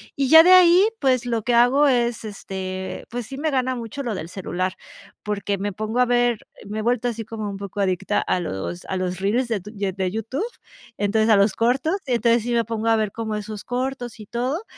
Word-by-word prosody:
y 275 -1 0
ya 320 +3 +9
de 365 - +5
ahí, 365 +2 +7
pues 255 -3 +2
lo 230 -3 -1
que 245 - 0
hago 255 +5 +5
es, 240 -3 +1
este, 190 -2 -6
pues 240 -2 -5
sí 270 - -8
me 310 +1 -1
gana 260 -1 0
mucho 235 +3 -6
lo 235 -3 -2
del 165 -2 -5
celular 185 0 -3 0.5
porque 200 -1 -2
me 205 +1 -2
pongo 215 +5 -3
a 250 - +5
ver, 240 -2 +2 0.2
eh, - - -15
me 215 +1 -4
he - - -1
vuelto 245 +1 0
así 230 -1 -3
como 215 -1 -6
un 195 - -6
poco 200 0 -7
adicta 195 +1 0
a 180 - 0
los 95 - -5
a 190 - -3
los 185 0 -3
reals 230 +6 +1
de 210 -5 -1
t 210 +3 -10
de 200 -3 -3
de 185 -1 -2
YouTube, 225 - -3 0.5
entonces, 215 +2 +1
a 215 - +7
los 200 0 +3
cortos. 270 +10 +1
Entonces, 235 -1 +2
sí 240 - -2
me 230 -1 +2
pongo 225 0 -3
a 225 - +5
ver 215 -2 -1
como 220 -2 -3
esos 210 0 -6
cortos 250 -2 -4
y 215 - -9
todo, 255 - -2
225 Hz, 230 wpm, -23 LUFS, 200-245 Hz, 0.5 s, ya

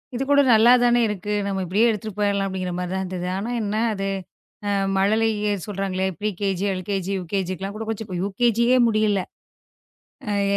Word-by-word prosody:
இது 255 - -1
கூட 285 - +6
நல்லாத்தானே 240 +2 +5
இருக்கு. 210 0 -3
நம்ம 195 -1 -2
இப்படியே 205 +7 +3
எடுத்துட்டு 215 -1 -4
போயிடலாம் 200 -1 +1
அப்படிங்குற 185 -2 -3
மாதிரி 180 0 -3
தான் 190 - -1
இருந்தது. 180 -1 -4
ஆனா 215 +5 -3
என்ன 205 +1 -2 0.2
அது? 195 0 -2 0.9
மழலையே 210 +1 +1 0.2
சொல்றாங்களே 195 -2 -2
ப்ரி 215 - 0
கே-ஜி, 195 -2 -1
எல்-கே-ஜி, 190 0 -3
யு-கே-ஜிக்கெல்லாம் 190 +2 -3
கூட 220 +1 -5
கொஞ்சம் 220 -2 -5
யு-கே-ஜியே 235 +5 +2
முடியலை. 215 -3 +1 1.2
அ - - +1
200 Hz, 150 wpm, -23 LUFS, 190-220 Hz, 1.2 s, கூட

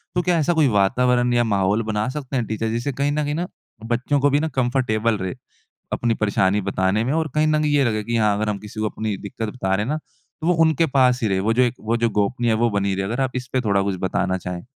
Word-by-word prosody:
तो 180 - +2
क्या 175 -1 +1
ऐसा 160 +3 +2
कोई 160 -3 +3
वातावरण 120 +3 +2
या 120 0 +3
माहौल 100 -1 +1
बना 110 0 -1
सकते 135 -1 -5
हैं 125 -3 0
टीचर 110 +1 -2
जिससे 120 +5 -2
कहीं 140 +3 0
न 150 +1 0
कहीं 145 0 -2
ना 175 +3 -2 0.4
बच्चों 125 +5 0
को 145 +1 +3
भी 145 +1 +2
ना 160 - 0
कंफ़र्टेबल 120 -3 +1
रहे 95 -2 -3 0.6
अपनी 120 -1 +1
परेशानी 100 -2 +1
बताने 95 +2 0
में, 130 +5 -1
और 160 0 0
कहीं 155 0 +3
न 155 0 +2
कहीं 150 -1 +1
ये 140 - +4
लगे 110 -3 0
कि 115 +2 -1
हाँ 105 -2 +2
अगर 105 0 -1
हम 105 - -1
किसी 105 +1 -9
को 110 0 0
अपनी 110 -1 -3
दिक्कत 105 +2 -5
बता 95 -5 -1
रहे 105 +2 -1
हैं - - -4
ना - - -1 0.4
तो 160 - -2
वो 180 - +4
उनके 160 0 +3
पास 130 -4 +2
ही 115 - +1
रहे, 95 -2 +1
वो 110 +4 +1
जो 125 - +3
एक 120 0 0
वो 115 +2 0
जो 115 0 +1
गोपनीय 115 +3 0
है - - +3
वो 120 +1 +2
बनी 100 -2 0
रहे। 95 0 -2
अगर 120 +7 -2
आप 130 -1 0
इसपे 125 0 -2
थोड़ा 100 -4 +1
कुछ 100 -1 -1
बताना 95 0 0
चाहें? 90 -1 -6
115 Hz, 270 wpm, -22 LUFS, 105-135 Hz, 0.6 s, ये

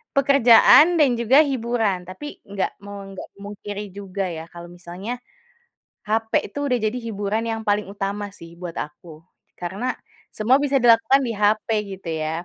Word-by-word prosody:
pekerjaan 275 +5 +6
dan 295 -3 +5
juga 235 +3 +4
hiburan, 235 -9 -1
tapi 185 +11 -9 0.2
nggak 200 -1 -3
mau 200 0 -8
nggak 195 - -8
memungkiri 205 0 -7
juga 200 -1 -4
ya, 160 -2 -6
kalau 170 0 -10
misalnya 175 +5 -8 1.0
HP 225 +1 -1 0.2
itu - - -6
sudah 250 -3 +1
jadi 215 +3 -1
hiburan 210 0 -2
yang 225 -1 -2
paling 205 0 +2
utama 200 +1 -4
sih 170 -3 -13
buat 175 -2 -7
aku, 150 +3 -7 0.5
karena 195 +9 -3 0.4
semua 225 +5 +3
bisa 285 -1 +1
dilakukan 235 +3 +5
di 235 - -2
HP 210 +1 +1 0.3
gitu 185 -2 -11
ya. 160 +2 -3
205 Hz, 155 wpm, -22 LUFS, 190-235 Hz, 1.0 s, pekerjaan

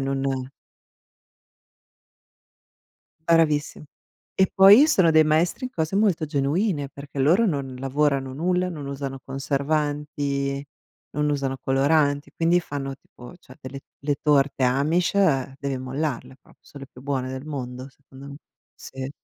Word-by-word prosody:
non 135 -1 -2 2.8
Bravissim 155 -3 +2 0.5
E, 190 -1 +4
poi 205 +9 +8
sono 185 - +4
dei 155 0 +5
maestri 165 - +1
in 255 - -4
cose 165 -3 -2
molto 185 -7 +2
genuine, 145 +2 0
perché 140 0 -10
loro 175 +12 +4
non 135 -6 -3
lavorano 135 0 0
nulla, 180 +4 0
non 150 -5 -7
usano 140 -1 -5
conservanti, 140 0 -2 0.5
non 150 +1 0
usano 135 -2 -1
coloranti, 145 +1 +1
quindi 170 +2 +3
fanno 140 -4 -5
tipo, 125 +1 -14
cioè 130 -6 -17
delle 135 +1 -8 0.2
le 145 0 -1
torte 140 -3 +2
amish 145 +8 +1 0.5
devi 140 -2 -3
mollarle 130 0 -4
prop - - -22
son 145 - -14
le 135 - -10
più 125 - -15
buone 135 -2 -2
del 130 +1 -6
mondo, 130 -3 -6
secondo 135 0 -15
me. 140 - -9 0.4
Sì. 130 0 -8
140 Hz, 130 wpm, -24 LUFS, 135-155 Hz, 2.8 s, poi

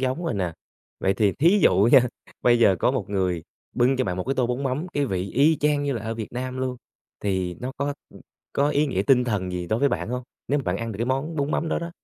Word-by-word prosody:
giống 130 +6 -1
rồi 165 - -1
nè. 90 -4 -1 0.5
Vậy 95 +1 +2
thì 100 -1 +2
thí 175 +8 +4
dụ 95 +4 +5
nha, 135 - +9 0.4
bây 120 -1 +5
giờ 100 -5 +5
có - - +3
một 115 -8 -3
người 90 -4 0 0.3
bưng 130 +2 +2
cho 130 - +1
bạn 90 - -2
một 90 - -3
cái 135 +2 -1
tô 125 -3 +1
bún 125 +3 -2
mắm, 135 +5 -1
cái 145 -1 0
vị 95 -2 -2
y 150 +4 +4
chang 145 -1 +1
như 140 -1 0
là 115 - -4
ở 115 - -3
Việt 110 -1 -6
Nam 130 +1 -4
luôn, 130 -1 -2 0.4
thì 95 -3 -1
nó 125 +2 -6
có, 140 +1 -2 0.2
ừm, - - -14 0.3
có 145 +1 +2
ý 150 +1 +2
nghĩa 110 -9 0
tinh 125 +3 +4
thần 100 -6 -2
gì 90 -1 -3
đối 110 +5 0
với 140 - +3
bạn 120 - -2
hông? 125 +1 -3 0.3
Nếu 145 - +2
mà 140 - -3
bạn 90 -3 -1
ăn 115 0 -4
được - - -7
cái 120 - -1
món 135 +5 -1
bún 140 0 0
mắm 160 - 0
đó - - 0
đó. 170 0 -5
125 Hz, 280 wpm, -24 LUFS, 100-140 Hz, 0.5 s, nha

